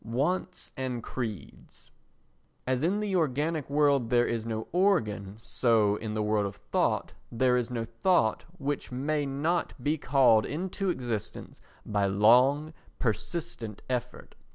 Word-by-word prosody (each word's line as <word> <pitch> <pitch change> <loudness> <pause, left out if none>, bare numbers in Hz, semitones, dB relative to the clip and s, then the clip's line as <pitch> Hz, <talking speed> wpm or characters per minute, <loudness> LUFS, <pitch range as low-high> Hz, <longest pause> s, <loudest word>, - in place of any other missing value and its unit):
Wants 165 - -2
and 125 -3 -3
Creeds 110 -7 -7 0.7
As 130 0 0
in 190 +7 +1
the 205 -2 -1
organic 155 -1 0
world 140 -4 +3
there 120 0 +4
is 115 -1 -2
no 110 -1 -3
organ, 110 - +1
so 115 -3 +2
in 110 -1 -5
the 110 - 0
world 105 -1 +1
of 100 - -8
thought 105 0 -1 0.2
there 125 +1 +2
is 125 -1 0
no 115 -2 -3
thought, 115 +1 +1
which 145 -3 -3
may 145 +3 -1
not 155 +6 -1
be 150 +2 0
called 125 -6 +4
into 185 +5 -2
existence 120 - -4 0.2
by 100 -2 +1
long 125 +10 +4 0.2
persistent 120 - -3
effort. 125 -1 -4
125 Hz, 135 wpm, -28 LUFS, 110-155 Hz, 0.7 s, there